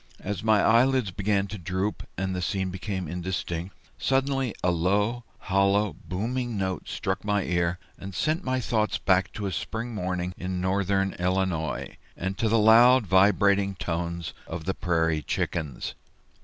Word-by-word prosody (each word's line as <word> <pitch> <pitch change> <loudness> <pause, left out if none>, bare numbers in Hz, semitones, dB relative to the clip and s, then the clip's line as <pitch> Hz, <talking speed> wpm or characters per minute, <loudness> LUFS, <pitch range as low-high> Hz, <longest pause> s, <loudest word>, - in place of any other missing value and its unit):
As 100 -1 -3
my 110 -2 +4
eyelids 125 -2 +4
began 100 +1 0
to 105 0 -6
droop 95 +4 -2 0.2
and 95 0 -1
the 90 - -2
scene 95 +1 -1
to - - -6
become 95 -1 -4
indistinct, 90 +1 -4 0.2
suddenly 135 -3 +1
a 90 - +3
low, 105 +8 +1 0.2
hollow, 100 +1 +2
booming 115 +6 -2
note 95 -1 -3
struck 95 0 -2
my 105 -1 +1
ear 85 0 0 0.2
and 95 -2 -8
sent 160 - 0
my 130 0 0
thoughts 110 -2 0
back 95 0 +2
to 105 - -4
a 95 - -1
spring 115 +7 -4
morning 90 -2 -2
in 90 0 -3
northern 95 +1 +1
Illinois, 90 -3 -1 0.2
and 95 +2 -2
to 110 - +2
the 115 - +4
loud 115 +3 +7
vibrating 100 +1 +4
tones 85 -1 -3
of 80 -1 -6
the 95 - 0
Prairie 80 -5 +1
Chickens. 75 -1 -3
95 Hz, 155 wpm, -26 LUFS, 90-105 Hz, 0.2 s, loud